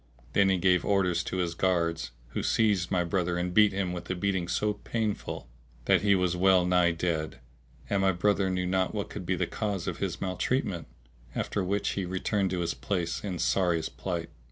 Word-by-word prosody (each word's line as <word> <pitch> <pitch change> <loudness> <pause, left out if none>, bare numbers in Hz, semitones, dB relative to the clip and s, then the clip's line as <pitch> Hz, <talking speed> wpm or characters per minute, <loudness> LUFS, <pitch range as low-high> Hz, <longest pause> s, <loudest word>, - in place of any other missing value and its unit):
Then 100 -1 +4
he 95 - +3
gave 90 0 +3
orders 90 -4 +2
to 95 - -3
his 85 -2 0
guards, 85 -5 0 0.2
who - - -3
seized 105 -5 +2
my 90 -2 +2
brother 85 0 0
and 90 0 -2
beat 105 +1 +6
him 95 -2 -2
with 90 - -7
a 95 - 0
beating 95 -1 -1
so 105 +4 0
painful 105 - -3 0.4
that - - +4
he 100 -1 +4
was 90 -1 +1
well 95 0 +4
nigh 90 -1 +4
dead; 80 -4 -2 0.5
and 100 -1 +1
my 95 0 +4
brother 95 +1 +1
knew 90 -1 -1
not 95 0 0
what - - -3
could - - -6
be - - +1
the - - 0
cause 100 -5 -3
of - - -3
his - - -2
maltreatment, 95 - -1 0.5
after 100 - -1
which 100 +2 0
he 100 - -2
returned 95 +2 0
to 90 -1 -1
his 85 -1 -1
place 85 -4 -2
in 95 -4 -3
sorriest 85 -1 +1
plight. 85 -3 -3
90 Hz, 200 wpm, -28 LUFS, 90-100 Hz, 0.5 s, beat